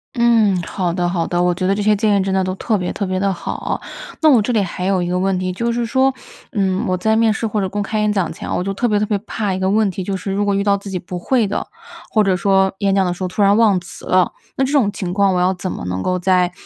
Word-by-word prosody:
嗯， 230 -4 +4
好 180 0 -2
的 175 0 0
好 175 -2 -1
的， 175 0 0
我 180 0 +2
觉 185 +1 -2
得 195 - +2
这 205 - -2
些 210 0 +4
建 210 0 +2
议 - - +1
真 190 0 -1
的 190 0 +2
都 185 0 -2
特 215 +2 0
别 180 -2 -3
特 200 - -3
别 185 0 -2
地 195 0 +1
好。 175 - -4 0.4
那 315 - +6
我 245 -5 +5
这 220 - -1
里 220 -3 +2
还 180 0 -4
有 190 -1 +1
一 - - -2
个 180 +1 0
问 190 0 +1
题， 185 0 -2
就 235 +6 -1
是 235 0 -1
说， 260 +3 +2 0.4
嗯， 190 -4 0
我 185 - 0
在 220 +4 +1
面 225 0 +3
试 220 +1 -2
或 210 -1 -1
者 190 - -1
公 205 +2 -2
开 215 +2 -2
演 210 0 +2
讲 195 -5 0
前， - - -8
我 - - -1
就 195 +1 -2
特 240 +5 0
别 210 -2 +2
特 210 - +1
别 210 - -1
怕 210 -1 -3
一 185 - -3
个 190 0 +1
问 210 +1 +2
题， 185 +1 -5
就 195 +1 -2
是 195 +1 -5
如 200 +1 0
果 200 -1 +1
遇 200 - +1
到 200 -1 +3
自 200 0 -9
己 190 - -3
不 180 0 -6
会 240 +5 +1
的， 205 +1 -3 0.4
或 215 - +3
者 195 -2 +2
说 190 +1 +2
演 195 -1 +1
讲 195 -1 +3
的 180 - 0
时 180 - -12
候 185 - 0
突 185 +3 -3
然 200 +1 +5
忘 215 -4 +4
词 175 - -11
了。 185 -1 +2 0.2
那 270 - +1
这 265 - -3
种 260 -9 +3
情 185 -3 -4
况 195 -1 +2
我 - - +1
要 180 +1 +2
怎 185 0 -5
么 - - -6
能 90 +1 -3
够 185 - 0
在 180 0 +2
195 Hz, 335 characters per minute, -19 LUFS, 185-210 Hz, 0.4 s, 那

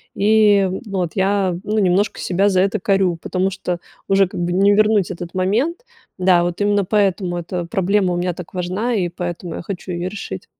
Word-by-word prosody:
и, 205 -2 +4 0.2
ну, 200 -3 -3
вот, 175 -3 -1
я, 195 -1 +1
ну, 215 +1 0
немножко 195 +1 +1
себя 190 +2 +1
за 185 -2 +3
это 200 +3 +1
корю, 190 -2 +1
потому 185 +1 -1
что 180 -2 -4 0.3
уже 195 0 +4
как - - -6
бы 175 0 -1
не 200 +2 +4
вернуть 210 -2 +3
этот 175 0 -7
момент. 225 - 0 0.3
Да, 180 -2 +4
вот, 175 +2 -3
именно 205 -1 +2
поэтому 190 -3 0
эта 175 +1 -4
проблема 190 +2 +1
у - - -1
меня 180 0 -1
так 175 0 -10
важна 185 +7 -2
и 185 -5 0
поэтому 175 0 -5
я - - -5
хочу 185 +1 -6
ее 175 +1 -3
решить. 185 - -6
190 Hz, 200 wpm, -19 LUFS, 175-205 Hz, 0.3 s, и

